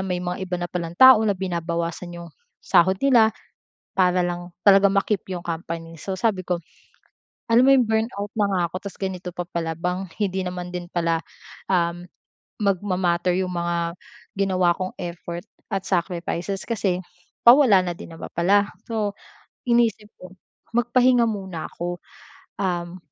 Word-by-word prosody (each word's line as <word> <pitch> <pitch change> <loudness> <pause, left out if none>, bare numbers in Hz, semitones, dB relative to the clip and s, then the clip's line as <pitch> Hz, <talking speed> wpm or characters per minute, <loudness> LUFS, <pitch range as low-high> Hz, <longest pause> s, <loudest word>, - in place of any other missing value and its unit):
may 180 -2 -1
mga 180 +1 -3
iba 185 -1 -2
na 175 - -3
pa 175 0 -3
lang 170 +1 -6
tao 260 -4 +9
na 205 -3 +1
binabawasan 170 -1 -3
'yong 170 0 -10 0.3
sahod 185 - +4
nila. 240 -5 +6 0.7
Para 180 -1 +3
lang 175 0 -5 0.2
talagang 195 0 +7
ma-keep 200 -1 0
'yong 175 -1 -5
company. 165 0 -5
So, 190 +4 -5
sabi 195 -2 +1
ko 180 -1 -1 0.9
alam 235 +2 +5
mo 270 - +6
'yong 255 -4 +4
burnout 220 -2 -1
na 210 - +3
nga 185 - +1
ako. 185 +4 -7
Tas 200 - -8
ganito 185 -2 -4
pa 175 0 -5
pala 165 -1 -2
bang 180 +2 -3
hindi 190 -2 0
naman 180 0 -5
din 180 0 -7
pala, 165 -1 0 0.5
um, 175 -1 +1 0.6
magma-matter 180 -2 +1
yung 185 -1 -1
mga 170 -1 -2 0.4
ginawa 185 -3 +3
kong 185 0 -4
effort 170 0 -6 0.2
at 195 -2 -2
sacrifices. 180 +1 -2
Kasi 190 -5 -1 0.4
pawala 235 -6 +7
na 175 - -2
din 165 -1 -9
naman 165 - -8
pala. 200 +4 +2 0.2
So, 215 -3 -1 0.5
inisip 235 -3 +1
ko 185 +1 -12 0.4
magpahinga 245 0 +4
muna 190 -7 -5
ako. 175 +1 -4 0.6
Um, 175 -1 -2
180 Hz, 155 wpm, -23 LUFS, 175-200 Hz, 0.9 s, tao